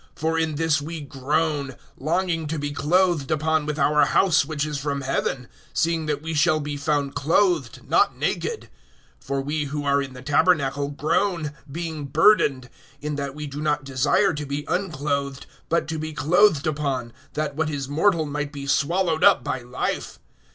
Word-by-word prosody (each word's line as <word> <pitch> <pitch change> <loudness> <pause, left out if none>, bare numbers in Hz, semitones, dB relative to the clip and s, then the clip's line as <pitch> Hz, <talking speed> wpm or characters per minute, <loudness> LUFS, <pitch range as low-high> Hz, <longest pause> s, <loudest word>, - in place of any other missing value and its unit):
(2)For 160 +1 0
in 160 -2 -1
this 160 -1 +1
we 160 +3 -5
groan, 145 0 -1 0.2
longing 165 +1 -1
to 160 +2 -3
be 145 0 -3
clothed 165 0 +2
upon 155 0 +1
with 150 0 -2
our 150 +1 +4
house 185 -7 +4
which 150 0 -2
is 150 -2 -3
from 140 0 -2
heaven; 130 -1 -2 0.3
(3)seeing 165 -1 +1
that 150 0 -2
we 160 0 -3
shall 155 +1 +3
be 145 -1 -4
found 140 -1 -1
clothed, 165 -3 +1
not 405 +1 +2
naked[5:3]. 460 -2 -2 0.6
(4)For 135 -1 -2
we 150 +1 -1
who 145 +1 -4
are 140 0 +3
in 135 -1 -6
the 125 - -10
tabernacle 145 -1 +2
groan, 155 +2 0 0.2
being 160 -1 -4
burdened; 140 -4 +3 0.3
in 150 +1 -3
that 140 -1 -4
we 150 0 -5
do 145 +1 -6
not 150 -1 0
desire 135 +8 +2
to 150 -1 -4
be 140 +1 -3
unclothed, 145 -6 -2 0.2
but 170 - +1
to 160 -1 -2
be 155 0 -4
clothed 160 +2 +3
upon, 140 -6 -2 0.2
that 150 -2 -2
what 155 0 0
is 140 -3 -3
mortal 160 +3 +2
might 150 0 -3
be 140 -2 -7
swallowed 165 +4 +1
up - - +6
by 130 - -2
life. 125 +1 -3
150 Hz, 175 wpm, -24 LUFS, 140-160 Hz, 0.6 s, up